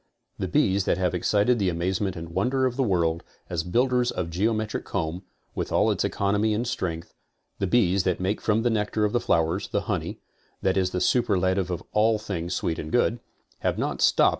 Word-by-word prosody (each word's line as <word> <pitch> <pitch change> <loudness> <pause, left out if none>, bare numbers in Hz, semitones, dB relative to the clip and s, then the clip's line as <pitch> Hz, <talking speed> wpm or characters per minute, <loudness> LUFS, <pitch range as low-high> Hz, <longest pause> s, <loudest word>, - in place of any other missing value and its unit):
The - - -1
bees 95 0 +2
that - - +1
have 90 -1 0
excited 105 +6 +2
the 95 -2 +2
amazement 90 +3 -1
and 85 -1 -7
wonder 125 +10 +1
of 125 -2 0
the 135 - 0
world 85 -8 +1 0.3
as 85 -2 0
build 120 +10 +1
ers 125 -1 +2
of 85 -2 -3
geometric 110 +4 -1
comb, 80 +2 -3 0.3
with - - -3
all - - +3
its - - 0
economy 105 +2 +1
and 120 +3 -1
strength, 85 -9 -3 0.5
the 100 - 0
bees 100 -3 +3
that 90 -2 0
make 95 +3 -1
from 110 +1 +1
the 120 - +2
nectar 105 0 0
of 105 - -1
the 120 - +3
flowers 85 -1 +1
the - - -1
honey, - - -3 0.4
that 95 - +2
is 95 -1 +2
the 90 -1 -2
superlative 95 -5 +2
of 90 - -3
all 110 +1 +3
things 90 -4 -4
sweet 80 - -2
and 80 - -6
good; 120 -1 +2 0.4
have - - -1
not - - -2
stopped. - - +5
95 Hz, 205 wpm, -25 LUFS, 90-110 Hz, 0.5 s, stopped